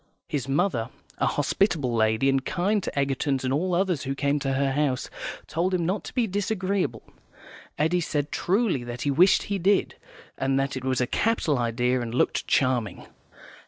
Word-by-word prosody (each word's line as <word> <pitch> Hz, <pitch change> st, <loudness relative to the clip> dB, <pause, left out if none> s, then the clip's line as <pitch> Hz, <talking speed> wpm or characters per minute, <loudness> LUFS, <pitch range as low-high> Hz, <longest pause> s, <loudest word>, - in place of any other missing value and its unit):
His 140 Hz, -4 st, -3 dB
mother, 135 Hz, -, 0 dB, 0.3 s
a -, -, +2 dB
hospitable 145 Hz, -, +1 dB
lady, 110 Hz, +3 st, +2 dB
and 135 Hz, -1 st, +2 dB
kind 195 Hz, +6 st, 0 dB
to 145 Hz, -, -3 dB
Egertons 135 Hz, 0 st, 0 dB
and 130 Hz, 0 st, 0 dB
all 175 Hz, +5 st, 0 dB
others 180 Hz, -5 st, +1 dB
who 135 Hz, 0 st, -3 dB
came 140 Hz, +1 st, 0 dB
to 135 Hz, -1 st, -1 dB
her 135 Hz, 0 st, +1 dB
house, 135 Hz, -2 st, -1 dB, 0.3 s
told 180 Hz, +3 st, 0 dB
him 170 Hz, -2 st, 0 dB
not 190 Hz, +5 st, -1 dB
to -, -, -8 dB
be 245 Hz, -3 st, +2 dB
disagreeable. 195 Hz, -, -1 dB, 0.7 s
Eddy 165 Hz, +4 st, +2 dB
said, 150 Hz, -2 st, -2 dB
truly, 190 Hz, -, +1 dB
that 120 Hz, 0 st, -6 dB
he 145 Hz, -, +1 dB
wished 175 Hz, +7 st, +5 dB
he 200 Hz, -1 st, -2 dB
did, 195 Hz, +2 st, +2 dB, 0.4 s
and 135 Hz, 0 st, +1 dB
that 135 Hz, +1 st, -1 dB
it 130 Hz, -, -5 dB
was 130 Hz, -1 st, 0 dB
a -, -, +3 dB
capital 160 Hz, -, +1 dB
idea 120 Hz, +2 st, +1 dB
and 120 Hz, 0 st, -4 dB
looked -, -, +1 dB
charming. 125 Hz, -8 st, +1 dB
140 Hz, 180 wpm, -26 LUFS, 130-180 Hz, 0.7 s, wished